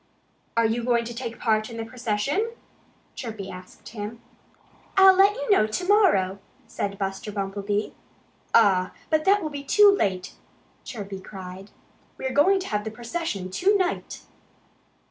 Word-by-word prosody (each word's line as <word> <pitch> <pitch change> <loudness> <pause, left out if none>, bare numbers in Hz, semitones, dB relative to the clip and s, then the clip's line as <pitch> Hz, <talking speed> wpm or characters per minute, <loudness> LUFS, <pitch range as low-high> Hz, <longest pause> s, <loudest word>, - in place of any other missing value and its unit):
"Are 230 - +4
you 230 +2 0
going 235 -1 +1
to 235 - -6
take 235 -1 -6
part 215 -1 +1
in 230 - -8
the 225 - -4
procession?" 250 - -1 0.6
Chirpy 215 -6 -6
asked 185 0 -12
him. 220 +1 -7 0.8
"I'll 385 0 +9
let 395 +2 +5
you - - -2
know 215 - +5
to 360 +12 -3
morrow," 310 - +3 0.3
said 200 0 -4
Buster 195 +1 -4
Bumblebee. 200 +1 -2 0.6
"Ah, 190 -5 +4 0.2
but 310 0 +2
that 400 0 +4
will 310 - -3
be 285 -1 -6
too 405 +7 +6
late!" 185 - -1 0.5
Chirpy 200 -4 -7
cried. 190 0 -9 0.5
"We're 260 -1 -3
going 380 +7 +4
to - - -6
have 210 -1 -1
the 220 - -4
procession 230 - -4
to 395 - +3
night." 370 -2 -3
230 Hz, 150 wpm, -25 LUFS, 200-325 Hz, 0.8 s, I'll